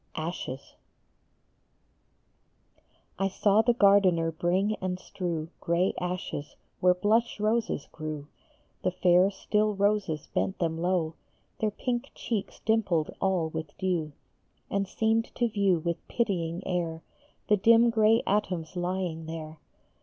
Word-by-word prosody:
ASHES. 155 Hz, -5 st, -5 dB, 2.6 s
SAW 205 Hz, +2 st, +3 dB
the 235 Hz, +1 st, +2 dB
gardener 195 Hz, -6 st, +4 dB
bring 180 Hz, +6 st, +1 dB
and 185 Hz, -1 st, -3 dB
strew 170 Hz, -4 st, -4 dB
Gray 170 Hz, +3 st, +1 dB
ashes 180 Hz, -5 st, -4 dB, 0.2 s
where 180 Hz, 0 st, +4 dB
blush 220 Hz, +5 st, +1 dB
roses 215 Hz, -7 st, 0 dB
grew. 155 Hz, -2 st, -5 dB, 0.6 s
The -, -, +1 dB
fair, 180 Hz, +1 st, +4 dB
still 210 Hz, +1 st, 0 dB
roses 200 Hz, -6 st, +1 dB
bent 190 Hz, -, 0 dB
them 165 Hz, -2 st, -1 dB
low, 175 Hz, -3 st, +1 dB, 0.5 s
Their 215 Hz, -, +1 dB
pink 240 Hz, +5 st, -3 dB
cheeks 215 Hz, -4 st, -4 dB
dimpled 195 Hz, -8 st, +1 dB
all 185 Hz, -4 st, +1 dB
with 160 Hz, -2 st, -6 dB
dew, 175 Hz, -6 st, -1 dB, 0.6 s
And 200 Hz, 0 st, 0 dB
seemed 225 Hz, +3 st, 0 dB
to 240 Hz, -, +2 dB
view 200 Hz, -5 st, +2 dB
with 170 Hz, +1 st, -4 dB
pitying 180 Hz, -6 st, -1 dB
air 165 Hz, -3 st, -2 dB, 0.4 s
The 210 Hz, -, +4 dB
dim 230 Hz, +3 st, +5 dB
gray 220 Hz, 0 st, +4 dB
atoms 185 Hz, -4 st, -1 dB
lying 175 Hz, -2 st, -2 dB
there. 160 Hz, -1 st, -7 dB
185 Hz, 120 wpm, -28 LUFS, 165-210 Hz, 2.6 s, dim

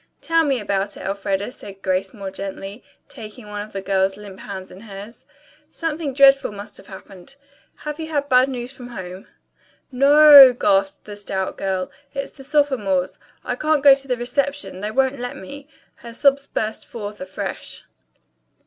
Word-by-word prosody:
"Tell 330 Hz, 0 st, +2 dB
me 275 Hz, -4 st, +1 dB
about 200 Hz, -1 st, -2 dB
it, -, -, -9 dB
Elfreda," 200 Hz, +2 st, -2 dB
said 195 Hz, -6 st, -11 dB
Grace 185 Hz, 0 st, 0 dB
more 200 Hz, -4 st, -7 dB
gently, 195 Hz, +2 st, -7 dB, 0.2 s
taking 215 Hz, +1 st, -11 dB
one 205 Hz, 0 st, -5 dB
of 215 Hz, -, -13 dB
the 195 Hz, -1 st, -5 dB
girl's 190 Hz, 0 st, +1 dB
limp 200 Hz, -2 st, -11 dB
hands 190 Hz, -2 st, -8 dB
in 185 Hz, -, -12 dB
hers. 205 Hz, +1 st, -11 dB, 0.4 s
"Something 320 Hz, -3 st, -3 dB
dreadful 275 Hz, -2 st, +5 dB
must 205 Hz, +1 st, -9 dB
have -, -, -15 dB
happened. 190 Hz, +3 st, -12 dB, 0.4 s
Have 300 Hz, +1 st, -7 dB
you 320 Hz, -, -4 dB
had 290 Hz, -3 st, -1 dB
bad 255 Hz, -1 st, +5 dB
news 245 Hz, -1 st, -5 dB
from 250 Hz, -2 st, -11 dB
home?" 185 Hz, -5 st, -8 dB, 0.6 s
"No 275 Hz, +2 st, +3 dB
o 300 Hz, 0 st, +8 dB
o," 250 Hz, -, 0 dB
gasped 290 Hz, +2 st, +1 dB
the 210 Hz, -, -8 dB
stout 195 Hz, -2 st, -4 dB
girl. 190 Hz, -1 st, -3 dB, 0.2 s
"It's 275 Hz, 0 st, -4 dB
the 270 Hz, -, -13 dB
sophomores. 260 Hz, -11 st, 0 dB, 0.2 s
I -, -, -2 dB
can't 305 Hz, +1 st, +1 dB
go 280 Hz, -1 st, +9 dB
to 275 Hz, 0 st, -3 dB
the 250 Hz, -2 st, -1 dB
reception. 275 Hz, -2 st, -2 dB
They 210 Hz, +2 st, -3 dB
won't 265 Hz, +3 st, 0 dB
let 245 Hz, 0 st, -5 dB
me." 280 Hz, +8 st, -10 dB, 0.3 s
Her 235 Hz, -1 st, -11 dB
sobs 280 Hz, +1 st, +2 dB
burst 220 Hz, 0 st, -3 dB
forth 210 Hz, -1 st, -7 dB
afresh. 275 Hz, -, -6 dB
235 Hz, 175 wpm, -21 LUFS, 195-275 Hz, 0.6 s, go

